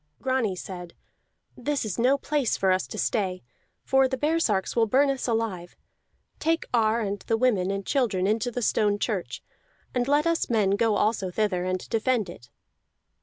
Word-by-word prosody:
Grani 255 -6 0
said: 180 -1 -8 0.6
"This 280 +1 -2
is 210 -1 -4
no 260 +4 +4
place 285 -3 0
for 190 -1 +2
us 185 0 +1
to - - -8
stay, 190 -4 -1 0.4
for 265 0 +3
the 260 0 -3
baresarks 295 -9 0
will 230 -1 +3
burn 275 +5 +3
us 270 -1 -3
alive. 220 -7 -2 0.6
Take 325 +1 0
Ar 225 -1 +3
and 200 -1 -2
the 225 - -1
women 215 -7 +2
and 195 0 -3
children 225 -10 +1
into 220 +4 +1
the 245 0 -4
stone 205 -1 +2
church, 205 -4 -3 0.5
and 245 0 0
let 290 +2 +3
us 335 0 +1
men 215 -5 +2
go 215 +1 +2
also 205 -2 +1
thither 185 -2 -1
and 185 0 -2
defend 225 -4 0
it." 120 -7 -14
220 Hz, 170 wpm, -26 LUFS, 195-255 Hz, 0.6 s, no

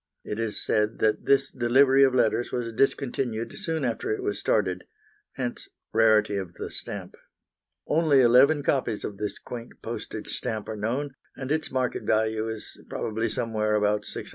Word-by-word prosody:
It 105 - -5
is 115 -2 -2
said 105 +1 +1
that 110 -1 +1
this 140 - +3
delivery 130 +3 +4
of 130 -1 +4
letters 120 0 +2
was 115 -2 -3
discontinued 120 -3 0
soon 165 -7 -1
after 115 -2 -2
it 110 - -1
was 100 -1 -2
started, 95 -3 0 0.5
hence 125 -3 -4 0.3
rarity 110 -2 +4
of 95 -3 -5
the - - -6
stamp. - - -4 0.7
Only 150 -3 +4
eleven 135 +5 +5
copies 125 -6 0
of 100 - -5
this 105 -1 -3
quaint 120 -1 -8
postage - - -6
stamp 110 -4 -3
are 110 - -3
known, 125 +7 -2 0.2
and 130 0 -5
its 155 0 0
market 130 -1 -1
value 110 0 +1
is 110 -1 -7
probably 115 +1 -2
somewhere 110 -1 0
about 105 0 +2
£600. - - -7
115 Hz, 165 wpm, -26 LUFS, 110-130 Hz, 0.7 s, eleven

